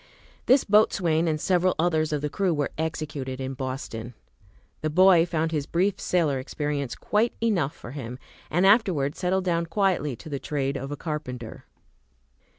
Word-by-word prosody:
This 260 +2 +5
boatswain 175 -6 +3
and 155 -1 0
several 180 +2 +2
others 160 -2 +1
of 150 -2 -1
the 150 - 0
crew 190 -4 +1
were 145 -1 -1
executed 155 -5 -4
in 130 0 -3
Boston. 130 -3 -5 0.7
The 155 - 0
boy 175 +1 +5
found 160 -1 -1
his 150 -3 -2
brief 190 +3 +1
sailor 155 -7 +1
experience 145 0 -3
quite 220 +3 0
enough 180 -11 0
for 120 - -10
him, 125 -3 -6 0.3
and 175 +4 +2
afterward 185 - +3
settled 185 +1 0
down 170 -1 0
quietly 165 -6 0
to 160 - -13
the 140 -3 -4
trade 140 -1 -2
of 135 +1 -5
a 145 - -4
carpenter. 130 -7 -6
155 Hz, 160 wpm, -26 LUFS, 140-180 Hz, 0.7 s, This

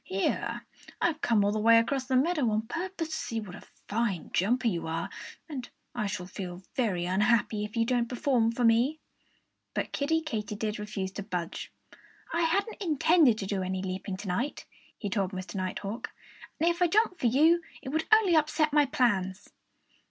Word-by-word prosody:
"Here 190 +1 -2 0.3
I've 320 -3 0
come 215 -4 +3
all 205 - +2
the 215 - -1
way 230 +2 +6
across 260 +3 +1
the 260 0 0
meadow 285 -2 +2
on 215 0 0
purpose 335 - -4
to - - -5
see 245 -7 -3
what 205 -5 -8
a - - -11 0.3
fine 205 -5 -1
jumper 240 +6 +2
you 170 -7 -1
are! 160 +1 -3 0.4
And 270 -6 -6 0.2
I 215 -4 -1
shall 195 -3 -4
feel 180 -1 -7
very 200 -9 0
unhappy 210 +3 +2
if 210 - -9
you 230 - +3
don't 240 -1 +1
perform 245 -2 +2
for 240 +1 -2
me." 240 +7 +3 0.8
But - - -2
Kiddie 320 +3 0
Katydid 215 -5 -3
refused 200 -2 -4
to - - -2
budge. 180 -4 -4 0.6
"I 335 - +1
hadn't 400 +7 0
intended 315 - +4
to 200 - -4
do 195 0 -1
any 185 0 -2
leaping 185 0 -4
to 200 - -8
night," 235 +11 -2 0.3
he 205 - -4
told 195 -1 -1
Mr. 185 0 -6
Nighthawk. 195 +3 -4 0.5
"And 325 - +2
if 345 +1 +1
I 355 - +6
jumped 400 -1 +2
for 250 - +2
you, 315 +8 +5 0.2
it - - -5
would 315 +3 0
only 430 -6 +6
upset 310 0 +2
my 295 -1 +5
plans." 210 -9 0
230 Hz, 185 wpm, -29 LUFS, 200-305 Hz, 0.8 s, way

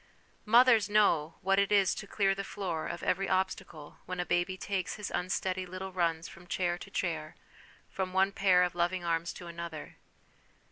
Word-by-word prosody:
Mothers 230 -2 +6
know 170 -7 +3
what 195 +1 +2
it 200 0 +1
is 200 -2 +4
to 200 - -7
clear 195 -1 +2
the 195 0 -4
floor 180 -5 -4
of 170 - -6
every 195 +2 0
obstacle 185 -5 -2
when 180 0 -4
a 180 - 0
baby 175 +2 0
takes 190 -2 -3
his 210 -2 -5
unsteady 185 0 -1
little 185 +1 -7
runs 165 -3 0
from 175 - -14
chair 175 -1 0
to - - -10
chair, - - -3 0.5
from 190 -1 -3
one 190 +1 +3
pair 185 -2 +4
of 180 - -1
loving 175 +1 0
arms 165 0 -1
to 175 - -10
another. 170 -2 -7
185 Hz, 180 wpm, -31 LUFS, 175-195 Hz, 0.5 s, Mothers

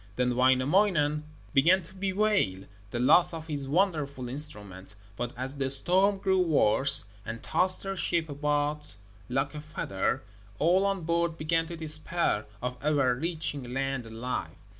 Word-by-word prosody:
Then 125 0 0
Wainamoinen 150 +4 +2 0.3
began 175 +7 +4
to 165 - -16
bewail 190 - -1 0.2
the 120 - -4
loss 165 +7 +4
of 160 -1 -8
his 145 -4 -3
wonderful 150 -7 -1
instrument; 105 -9 -2 0.2
but 120 +2 -4
as 130 +2 -5
the 135 -1 -1
storm 185 +9 +7
grew 190 -1 0
worse, 140 - +3 0.2
and 115 +1 -7
tossed 185 0 +1
their 195 0 -4
ship 170 -3 -1
about 145 -2 -3 0.3
like 135 +3 -2
a 150 - -7
feather, 150 - -3 0.3
all 185 +5 +2
on 195 -3 -2
board 170 0 -1
began 165 +1 -1
to 170 0 -8
despair 155 -7 0 0.2
of 125 0 -4
ever 140 -4 +2
reaching 145 -3 -3
land 135 -3 -3
alive. 115 -6 -5
150 Hz, 145 wpm, -27 LUFS, 130-170 Hz, 0.3 s, storm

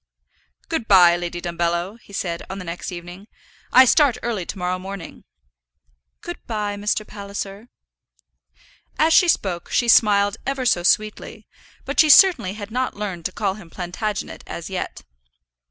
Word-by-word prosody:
"Good 320 -9 -3
by, 175 -3 +7
Lady 175 0 -4
Dumbello," 175 +4 -2
he - - -18
said, 170 -4 -3
on 190 - -5
the 185 - -7
next 170 +3 -6
evening. 175 +3 -9 0.4
"I 260 +1 +8
start 280 -1 +4
early 215 -7 -3
to - - -6
morrow 180 0 -2
morning." 190 -2 -9 1.0
"Good 345 0 -7
by, 210 -3 -2
Mr. 210 +1 -2
Palliser." 200 +1 -7 1.3
As 320 +1 +3
she 365 -1 +6
spoke 180 - 0
she 240 - +1
smiled 205 -2 +4
ever 270 -1 -3
so 180 -7 +2
sweetly, 215 +4 -1 0.4
but - - -3
she 310 - +6
certainly 285 - +6
had 210 0 -8
not 255 +2 -2
learned 190 -5 -5
to - - -1
call 195 -1 -1
him 195 -4 -13
Plantagenet 190 +4 -5
as 170 +2 -7
yet. 185 - -5
200 Hz, 155 wpm, -22 LUFS, 180-225 Hz, 1.3 s, I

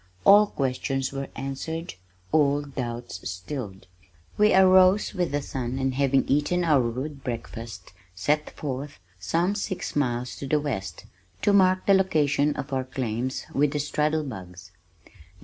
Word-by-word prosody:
All 205 +1 +8
questions 135 -3 -2
were 135 0 -4
answered, 160 +6 -5 0.4
all 145 -1 +3
doubts 120 -7 -5
stilled. 95 +1 -6 0.5
We 210 0 +4
arose 185 +2 +5
with 180 -5 -1
the 145 0 -1
sun 130 -1 -4
and 135 -1 0
having 135 0 +2
eaten 150 +6 +1
our 150 -5 +4
rude 130 +4 -4
breakfast 115 -4 -7 0.2
set 150 +12 0
forth, 140 0 -6 0.2
some 170 - 0
six 200 -2 -4
miles 125 -3 -1
to 140 - -6
the 150 +2 +2
west, 130 -11 -4 0.4
to 205 - +4
mark 185 -1 +4
the 200 - +5
location 150 -6 +2
of 140 0 -5
our 130 -1 0
claims 130 -1 -3
with 140 +1 +2
the 150 - -1
"straddle 150 +2 0
bugs." 90 - -9
140 Hz, 145 wpm, -26 LUFS, 125-160 Hz, 0.5 s, All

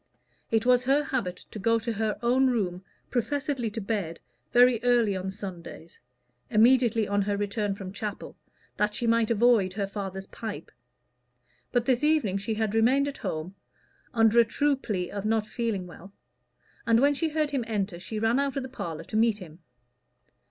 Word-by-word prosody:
It 225 0 +1
was 250 0 +4
her 280 +3 +3
habit 225 -11 -3
to 215 - -7
go 230 +3 +2
to 230 0 -3
her 220 0 -1
own 255 +3 +3
room, 190 -7 -1 0.3
professedly 270 -1 -1
to 215 - -5
bed, 195 -6 -3 0.3
very 245 -1 +5
early 240 -5 +3
on 190 0 -3
Sundays 185 -4 -9 0.5
immediately 230 -1 +4
on 205 0 +1
her 200 0 -1
return 205 0 -1
from 195 -1 -8
chapel 205 0 -6 0.4
that 210 0 0
she 240 - -2
might 230 -1 +2
avoid 230 -4 +3
her 200 0 -1
father's 195 -1 -5
pipe. 215 +1 -7 1.0
But 245 -2 +1
this 255 +1 +1
evening 295 -11 +2
she 215 +3 -3
had 215 -1 -1
remained 255 +6 +3
at 285 - -6
home, 160 +4 -4 0.6
under 225 -1 +4
a - - +8
true 285 +6 +1
plea 195 -9 -3
of 200 -1 -4
not 220 0 +1
feeling 220 -5 -3
well; 180 +2 -12 0.8
and 230 0 +5
when 285 +3 +4
she 320 +3 -1
heard 305 -1 -1
him 270 -4 -1
enter, 200 -5 -2
she 215 +4 -6
ran 225 +4 +2
out 280 -1 -1
of 275 - -1
the 260 - -7
parlor 165 -10 -6
to 215 - -8
meet 220 -1 +3
him. 170 -4 -12
225 Hz, 180 wpm, -27 LUFS, 200-245 Hz, 1.0 s, a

